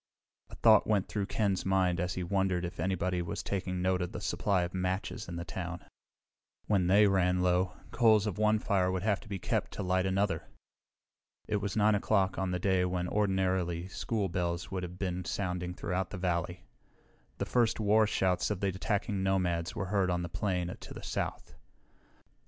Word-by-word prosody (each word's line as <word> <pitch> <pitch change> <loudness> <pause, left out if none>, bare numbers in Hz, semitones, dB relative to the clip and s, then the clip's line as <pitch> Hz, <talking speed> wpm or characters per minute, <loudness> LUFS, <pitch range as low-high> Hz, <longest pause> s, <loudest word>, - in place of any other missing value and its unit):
A - - -10
thought 110 -2 +5
went 105 -3 +2
through 100 -2 -2
Ken's 100 -4 0
mind 95 -2 +2
and 90 0 0
he 90 -1 -3
wondered 95 -1 0
if 85 - -7
anybody 90 0 0
was 85 - -4
taking 90 -2 -2
note 95 0 +1
of 90 - -3
the - - -4
supply 95 -3 0
of 85 - -4
matches 95 +1 -2
in 85 - -5
town. 90 -1 -5 0.8
When 95 -4 +2
they 100 +3 +6
ran 90 -2 +2
low, 90 +1 +2 0.2
coals 110 -3 +4
of 105 -1 -3
one 110 0 +4
fire 95 -3 +1
would 95 0 -2
have 105 -2 +1
to - - -15
be 100 - -3
kept - - -1
to 105 - -4
light 95 +1 +1
another. 95 +1 0 1.0
It 105 - +1
was 100 -1 -3
9 105 0 +4
o'clock, 100 -2 +1
on 95 -1 -1
a 90 - 0
day 95 0 +2
when 90 -1 -1
ordinarily 95 -4 0
school 105 0 -2
bells 85 -1 -2
would 95 -1 -2
have 90 0 -6
been 90 -1 -2
sounding 90 -1 -3
throughout 95 0 -2
the 105 - -6
valley. 90 -1 -2 0.7
The - - -2
first 120 -3 +2
war 110 0 +4
shouts 95 -3 +1
of 105 -3 -2
the 100 - +1
attacking 100 +1 -1
nomads 90 -3 0
were 95 - -2
heard 95 -3 +2
on 90 0 0
the 85 - -4
plain 90 -1 -2
to - - -10
the - - -9
south. - - -4
95 Hz, 190 wpm, -31 LUFS, 90-100 Hz, 1.0 s, they